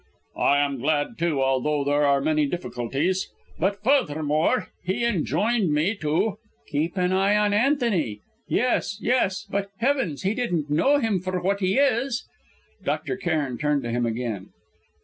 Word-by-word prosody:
"I 140 Hz, -, +4 dB
am 140 Hz, -2 st, 0 dB
glad, 150 Hz, -, 0 dB
too, 155 Hz, -5 st, +1 dB
although 135 Hz, +2 st, +1 dB
there 145 Hz, +1 st, +2 dB
are 140 Hz, -1 st, +3 dB
many 155 Hz, 0 st, +2 dB
difficulties. 160 Hz, +3 st, -2 dB, 0.3 s
But, 200 Hz, +4 st, 0 dB
furthermore, 155 Hz, -, +1 dB
he 195 Hz, +6 st, -1 dB
enjoined 210 Hz, 0 st, +1 dB
me 155 Hz, +8 st, +2 dB
to 170 Hz, +5 st, 0 dB
" 145 Hz, 0 st, -39 dB
"Keep 160 Hz, +6 st, -1 dB
an 180 Hz, 0 st, +1 dB
eye 195 Hz, +2 st, +3 dB
on 210 Hz, -1 st, +2 dB
Antony! 210 Hz, -, +1 dB, 0.3 s
Yes, 245 Hz, -4 st, 0 dB
yes 230 Hz, -6 st, +1 dB
but, 200 Hz, 0 st, -2 dB
heavens! 245 Hz, -, 0 dB
he 195 Hz, +3 st, +1 dB
didn't 175 Hz, -, -2 dB
know 220 Hz, -, +4 dB
him 225 Hz, -8 st, +1 dB
for 185 Hz, 0 st, -2 dB
what 195 Hz, +3 st, 0 dB
he 190 Hz, +2 st, +1 dB
is!" 265 Hz, -2 st, +1 dB, 0.6 s
Dr. -, -, -2 dB
Cairn 155 Hz, -9 st, -2 dB
turned 150 Hz, -2 st, +1 dB
to 120 Hz, -, -3 dB
him 120 Hz, 0 st, 0 dB
again. 115 Hz, -4 st, -4 dB
175 Hz, 155 wpm, -24 LUFS, 145-210 Hz, 0.6 s, I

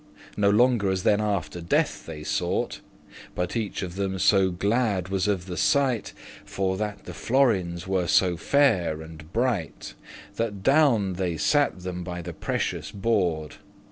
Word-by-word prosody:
No 100 Hz, -1 st, +3 dB
longer 115 Hz, -1 st, +3 dB
as 95 Hz, -1 st, -1 dB
then 105 Hz, 0 st, +3 dB
after 90 Hz, -6 st, -2 dB
Death 85 Hz, -, 0 dB
they 75 Hz, -2 st, -7 dB
sought; -, -, -1 dB, 0.6 s
But 90 Hz, +4 st, -2 dB
each 110 Hz, -4 st, -2 dB
of 90 Hz, -2 st, -5 dB
them 95 Hz, -1 st, -1 dB
so 95 Hz, 0 st, +4 dB
glad 100 Hz, 0 st, 0 dB
was 95 Hz, 0 st, 0 dB
of 95 Hz, -4 st, 0 dB
the 90 Hz, -2 st, -6 dB
sight, 135 Hz, -6 st, +1 dB, 0.3 s
For 95 Hz, -1 st, -2 dB
that 105 Hz, +1 st, -4 dB
the -, -, -7 dB
florins 95 Hz, -10 st, +1 dB
were 95 Hz, -2 st, 0 dB
so 90 Hz, +1 st, +3 dB
fair 90 Hz, -, +2 dB
and 80 Hz, 0 st, -12 dB
bright, 110 Hz, -, -2 dB, 0.4 s
That 105 Hz, -4 st, -3 dB
down 135 Hz, -9 st, +3 dB
they 90 Hz, -2 st, -2 dB
sat 145 Hz, -, +1 dB
them 90 Hz, -1 st, -5 dB
by 90 Hz, -1 st, -6 dB
the 85 Hz, 0 st, -6 dB
precious -, -, -3 dB
hoard. 85 Hz, -9 st, 0 dB
95 Hz, 155 wpm, -25 LUFS, 90-110 Hz, 0.6 s, so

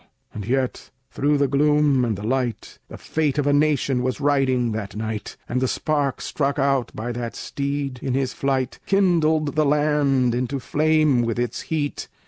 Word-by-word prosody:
And 105 Hz, -1 st, -6 dB
yet, 130 Hz, 0 st, -1 dB, 0.2 s
through 145 Hz, +1 st, +1 dB
the 140 Hz, 0 st, +2 dB
gloom 145 Hz, -1 st, +3 dB
and 115 Hz, -4 st, -1 dB
the 100 Hz, -, -7 dB
light, 125 Hz, -2 st, -2 dB
The -, -, -10 dB
fate 155 Hz, -3 st, -1 dB
of 145 Hz, -, +1 dB
a 145 Hz, -, +3 dB
nation 145 Hz, -3 st, +2 dB
was 130 Hz, +2 st, -2 dB
riding 135 Hz, -4 st, +2 dB
that 105 Hz, -2 st, -5 dB
night; 110 Hz, -1 st, -5 dB
And 125 Hz, +1 st, -1 dB
the 130 Hz, -, +2 dB
spark 145 Hz, -1 st, -1 dB
struck 140 Hz, -1 st, -1 dB
out 135 Hz, -2 st, +1 dB
by 120 Hz, +3 st, -4 dB
that 120 Hz, -1 st, -5 dB
steed, 140 Hz, -2 st, -3 dB
in 130 Hz, -2 st, -1 dB
his 135 Hz, -1 st, -1 dB
flight, 135 Hz, -4 st, -1 dB
Kindled 160 Hz, -6 st, +2 dB
the 155 Hz, -, +3 dB
land 145 Hz, -4 st, +2 dB
into 125 Hz, +3 st, -2 dB
flame 155 Hz, -1 st, +2 dB
with 115 Hz, -1 st, -1 dB
its 120 Hz, 0 st, -2 dB
heat. 150 Hz, -3 st, -2 dB
135 Hz, 175 wpm, -23 LUFS, 125-150 Hz, 0.2 s, gloom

